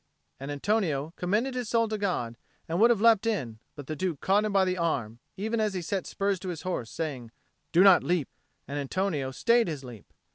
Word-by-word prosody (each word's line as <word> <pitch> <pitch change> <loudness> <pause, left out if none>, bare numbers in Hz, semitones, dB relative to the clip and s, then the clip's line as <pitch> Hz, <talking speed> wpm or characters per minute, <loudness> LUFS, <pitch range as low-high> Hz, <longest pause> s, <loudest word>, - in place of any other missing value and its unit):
And 135 +2 -6
Antonio 155 -2 -1
commended 215 +9 0
his 250 -3 -3
soul 230 -1 +2
to 215 - -2
God, 175 - -2 0.3
and 170 +2 -1
would 230 - +7
have 230 -4 +2
leapt 225 -1 +5
in; 125 - -2 0.2
but 145 -2 -8
the 155 - -4
Duke 170 -3 -2
caught 205 +3 +2
him 215 - -1
by 195 -1 +3
the 185 0 0
arm 130 -10 -2 0.2
even 220 +4 -1
as 210 -2 0
he 180 - -2
set 190 +3 -2
spurs 200 -1 -1
to 185 - -6
his 170 -3 -5
horse, 175 -11 -3
saying, 140 -8 -5 0.4
"Do 175 +3 +6
not 195 -2 +7
leap." 175 -6 0 0.4
And 145 +2 -3
Antonio 145 -1 -1
stayed 230 - +2
his 150 -5 -4
leap. 120 -5 -12
180 Hz, 215 wpm, -28 LUFS, 145-210 Hz, 0.4 s, would